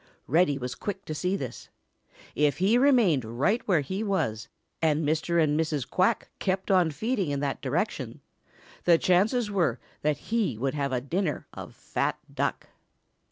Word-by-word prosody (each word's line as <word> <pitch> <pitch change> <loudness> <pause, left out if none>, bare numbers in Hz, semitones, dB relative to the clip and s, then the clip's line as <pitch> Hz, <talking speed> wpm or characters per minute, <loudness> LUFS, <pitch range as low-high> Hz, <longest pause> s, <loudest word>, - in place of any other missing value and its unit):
Reddy 150 -1 +3
was 125 -2 -4
quick 200 -1 -5
to 155 - -4
see 180 +5 -1
this. 130 - -6 0.6
If 145 -1 +2
he 195 +6 +3
remained 240 - +4
right 135 - 0
where 175 -7 +3
he 190 +9 -4
was, 115 - -1 0.3
and 155 -1 +2
Mr. 160 +2 +1
and 155 -1 +2
Mrs. 155 -4 -1
Quack 195 +5 +1
kept 190 0 -1
on 180 -4 +4
feeding 205 - -1
in 140 -1 -1
that 140 -2 -2
direction, - - -2 0.7
the 170 -2 +6
chances 210 +7 +2
were 170 - +1 0.2
that 150 -1 +1
he 215 - -1
would 135 +3 -1
have 140 -2 -1
a 125 -1 0
dinner 165 +4 -2
of - - -9
fat - - -2 0.2
Duck. - - -2
165 Hz, 160 wpm, -27 LUFS, 140-195 Hz, 0.7 s, the